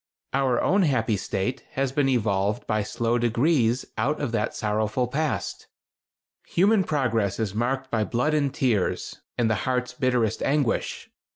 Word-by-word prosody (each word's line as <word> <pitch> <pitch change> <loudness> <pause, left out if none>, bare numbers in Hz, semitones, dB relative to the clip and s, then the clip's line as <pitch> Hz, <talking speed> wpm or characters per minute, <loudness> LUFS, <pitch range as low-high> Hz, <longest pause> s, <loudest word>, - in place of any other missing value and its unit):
Our 130 -2 +2
own 195 +2 +3
happy 115 - +2
state 95 +4 -2
has 135 -1 0
been 135 0 +2
evolved 105 -4 0
by 110 0 0
slow 115 +3 0
degrees 120 0 +2
out 140 +7 0
of - - -2
that 110 -1 -1
sorrowful 110 +3 0
past. 150 +4 -2 0.8
Human 200 +3 +3
progress 115 - 0
is 105 -3 -1
marked 130 +4 -1
by 110 -2 +1
blood 125 +7 0
and 145 -3 +1
tears, 115 -9 -1 0.2
and 120 - +2
the 110 - +2 0.2
heart's 125 0 -1
bitterest 125 -4 0
anguish. 140 -4 0
125 Hz, 150 wpm, -25 LUFS, 110-135 Hz, 0.8 s, own